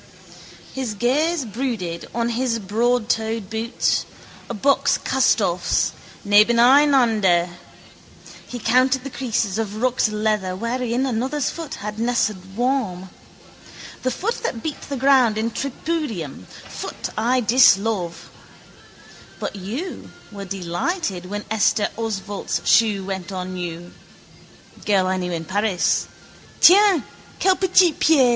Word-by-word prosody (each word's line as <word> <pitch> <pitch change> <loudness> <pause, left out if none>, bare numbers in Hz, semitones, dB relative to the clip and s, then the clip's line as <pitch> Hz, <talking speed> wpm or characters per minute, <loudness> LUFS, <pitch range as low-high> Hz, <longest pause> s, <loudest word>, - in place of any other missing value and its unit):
His 255 -5 -4
gaze 285 - +1
brooded 215 -7 -4
on 235 0 0
his 240 0 -1
broadtoed 225 0 -1
boots, 225 +2 -1 0.4
a - - -3
buck's 280 +7 +2
castoffs, 200 -9 +1 0.3
nebeneinander. 230 -4 +4 1.0
He 245 - -6
counted 255 +3 +2
the 275 - -7
creases 225 -6 -2
of 215 -1 -3
rucked 250 -3 +1
leather 210 -3 -1
wherein 240 +4 -1
another's 265 +3 -1
foot 325 -3 -7
had 210 0 -5
nested 215 -5 -1
warm. 225 -8 -1 0.9
The 255 - 0
foot 405 - -3
that 230 - -4
beat 310 - -4
the 280 - -3
ground 255 -4 +4
in 225 +1 -1
tripudium, 250 - -4
foot - - -8
I 240 +4 +1
dislove. 210 -6 +3 1.1
But - - -4
you 220 - -6 0.2
were 200 -1 -7
delighted 190 - -3
when 205 +2 -5
Esther 220 0 +2
Osvalt's 210 -3 -4
shoe 210 -4 +3
went 190 -1 -5
on 185 -1 -5
you: 175 -1 -6 0.9
girl 195 -3 +2
I 185 0 0
knew 180 -1 -3
in 165 -1 -4
Paris. 200 +1 0 0.5
_Tiens, 380 - +6 0.4
quel 380 -1 +3
petit 370 -2 +4
pied! 285 -6 +4
225 Hz, 115 wpm, -21 LUFS, 195-260 Hz, 1.1 s, Tiens